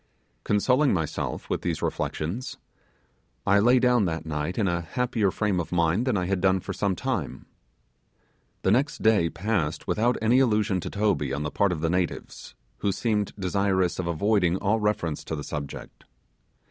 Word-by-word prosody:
Consoling 125 +5 +2
myself 80 -4 -3
with - - -2
these - - -2
reflections, 90 +12 -3 0.9
I 100 +1 +4
lay 120 +5 +5
down 125 -3 +3
that 80 -2 -3
night 75 +3 -3
in 105 -4 +1
a 85 -1 0
happier 115 +2 0
frame 100 -1 0
of 85 - -4
mind 90 +7 +1
than 120 -5 +2
I 90 - -1
had 95 0 -1
done 95 0 +3
for - - -6
some 100 -2 0
time. 115 - -3 1.2
The 95 - +3
next 135 +7 +1
day 105 -7 +4
passed 85 -6 -2
without 120 +3 +1
any 115 +4 +3
allusion 105 -6 +2
to - - -5
Toby 105 0 0
on 70 +2 -2
the 75 - -3
part 100 -2 +2
of 80 -3 -3
the 80 - +1
natives, 90 -1 -3 0.2
who 100 - +1
seemed 105 0 -1
desirous 95 -1 0
of 90 - -2
avoiding 90 +1 +2
all 105 +3 +1
reference 105 -7 -1
to 80 - -3
the 75 - -5
subject. 70 -2 -7
100 Hz, 170 wpm, -26 LUFS, 85-110 Hz, 1.2 s, lay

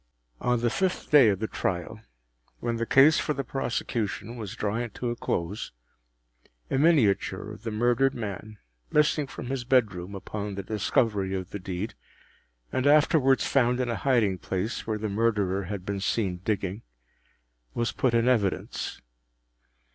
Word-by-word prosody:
On 125 -1 +1
the 120 0 +1
fifth 190 +3 -1
day 140 -7 +8
of 100 - +1
the 110 +3 -2
trial, 95 +4 -3 0.6
when 120 -1 -2
the 115 0 -2
case 145 +4 +6
for 150 - -1
the 140 - -2
prosecution 115 -4 -3
was 110 -5 -6
drawing 115 +3 -2
to 120 +2 -3
a - - -3
close, 90 -2 -3 1.0
a - - +2
miniature 140 -11 +2
of - - -10
the - - -4
murdered 120 +5 +2
man, 110 -1 -6 0.3
missing 150 -1 +3
from - - -8
his 135 -2 -2
bedroom 105 -7 +1
upon 100 +1 -5
the 100 - -4
discovery 100 -1 0
of 95 -1 -5
the 100 - -5
deed, 95 +3 -4 0.8
and 130 +2 0
afterwards 145 -2 +4
found 125 -2 +2
in 125 -1 0
a 115 - 0
hiding 110 -8 +2
place 95 +7 -3
where 110 -1 -1
the 110 +1 -3
Murderer 100 -3 0
had 95 -1 -5
been 100 0 -2
seen 95 -2 0
digging, 100 +1 -2 0.9
was 120 0 0
put 125 -3 +1
in 115 +1 +3
evidence. 110 -7 0
110 Hz, 155 wpm, -27 LUFS, 100-125 Hz, 1.0 s, day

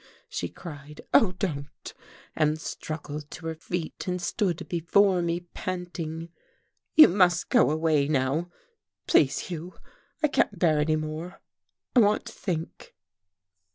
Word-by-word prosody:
she - - -4
cried. 150 -3 -10
"Oh, 190 -5 +5
don't!" 150 -7 -5 0.4
and 155 0 +1
struggled 150 -2 -6
to 165 - -9
her 165 - -2
feet 160 +2 -5
and 180 0 -1
stood 175 -1 -1
before 180 +2 +3
me 170 0 -1
panting. 170 -3 -5 0.7
"You 310 - +11
must 180 -2 +3
go 245 - +5
away 155 -2 +2
now 145 +4 0 0.6
please, 135 -3 +4
Hugh. 175 +1 -6 0.5
I - - +6
can't 210 -8 +1
bear 160 -3 +3
any 155 +1 +2
more 155 +4 -5 0.6
I - - +8
want 210 -2 +3
to - - -9
think." 165 -5 -5
165 Hz, 130 wpm, -27 LUFS, 155-180 Hz, 0.7 s, You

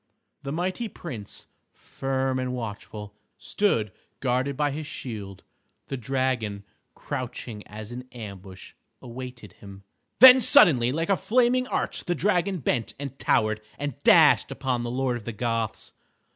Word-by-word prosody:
The 140 - -5
mighty 185 +8 -2
Prince, 120 - -8 0.3
firm 135 -1 -2
and 130 0 -2
watchful, 105 -3 -7 0.2
stood 115 - 0 0.3
guarded 130 +1 0
by 145 -1 +1
his 150 +1 -5
shield. 100 -9 -7 0.5
The 135 - -2
dragon, 125 -5 -1 0.3
crouching 120 -3 -6
as 105 +1 -9
in 125 +1 -8
ambush, 100 -5 -10 0.3
awaited 125 -4 -9
him. 100 0 -13 0.3
Then 260 +2 +10
suddenly 125 - +6
like 165 +5 -2
a - - +5
flaming 250 +2 +2
arch - - -2
the 175 - 0
dragon 190 0 +1
bent 120 -2 -1
and 140 -1 -7
towered, 110 0 +1 0.2
and 145 -3 -5
dashed - - +6
upon 125 -2 -2
the 120 - -3
Lord 125 0 -1
of 110 - -12
the 115 - -4
Goths. 115 0 -2
125 Hz, 140 wpm, -26 LUFS, 110-145 Hz, 0.5 s, Then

